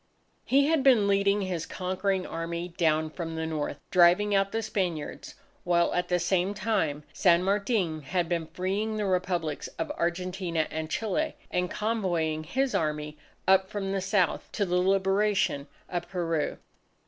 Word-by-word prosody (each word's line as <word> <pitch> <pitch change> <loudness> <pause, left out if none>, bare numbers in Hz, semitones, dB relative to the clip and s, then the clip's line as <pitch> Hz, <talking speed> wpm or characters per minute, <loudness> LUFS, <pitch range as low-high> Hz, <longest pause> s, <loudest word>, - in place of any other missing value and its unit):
He 275 +1 +4
had 315 -1 +2
been 250 -7 +5
leading 200 0 +2
his 180 -4 -3
conquering 185 +1 -1
Army 170 +1 -4
down 160 -2 +1
from 165 -1 -5
the 160 0 -2
North, 155 -2 -3
driving 180 +3 +5
out 195 0 +2
the 225 0 -1
Spaniards; 180 -8 -3 0.3
while 170 -1 +2
at 180 0 0
the 180 - +2
same 185 +3 +1
time, 190 -9 0
San 175 -2 +4
Martin 195 -5 0
had 170 +4 -1
been 170 -2 -1
freeing 200 +6 -2
the 210 - -1
Republics 180 -5 -1
of 165 -1 -2
Argentina 175 -1 -1
and 160 0 -4
Chile 215 +2 -1 0.2
and 180 0 0
convoying 175 -9 -1
his 265 - 0
Army 150 -1 -1 0.3
up 190 0 +4
from 200 -2 -3
the 195 -1 -1
South 190 -2 0
to 200 - 0
the 180 -1 +1
liberation 195 -4 +2 0.2
of 175 -1 -4
Peru. 165 -4 -1
180 Hz, 155 wpm, -28 LUFS, 165-200 Hz, 0.3 s, been